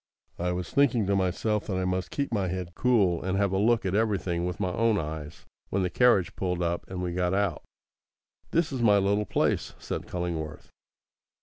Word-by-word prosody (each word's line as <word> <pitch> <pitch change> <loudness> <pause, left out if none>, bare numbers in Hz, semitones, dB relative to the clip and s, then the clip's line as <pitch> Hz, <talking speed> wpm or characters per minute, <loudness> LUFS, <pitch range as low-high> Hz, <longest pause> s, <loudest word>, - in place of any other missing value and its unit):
I 90 +1 0
was 90 -1 -4
thinking 130 -6 +3
to 100 +1 +1
myself 100 +3 0
that 95 -3 -1
I 95 - 0
must 90 0 -1
keep 140 -4 -2
my 100 -4 +1
head 90 -1 -4
cool, 100 -7 +2
and 95 +1 -1
have 100 -1 +2
a 95 - +1
look 115 +1 +3
at 95 - 0
everything 95 -5 0
with 90 0 -4
my 90 -3 -1
own 115 0 +2
eyes, 75 -1 -6 0.2
when 95 0 0
the 90 - -1
carriage 115 -5 +3
pulled 90 -2 -1
up 85 0 -2
and 90 -1 -4
we 90 -1 -2
got 90 +1 0
out. 100 -2 0 0.9
"This 165 -2 +1
is 130 -3 -3
my 105 -3 +5
little 100 +1 +1
place," - - 0
said - - -5
Cullingworth. 80 -4 -4
95 Hz, 200 wpm, -27 LUFS, 90-105 Hz, 0.9 s, my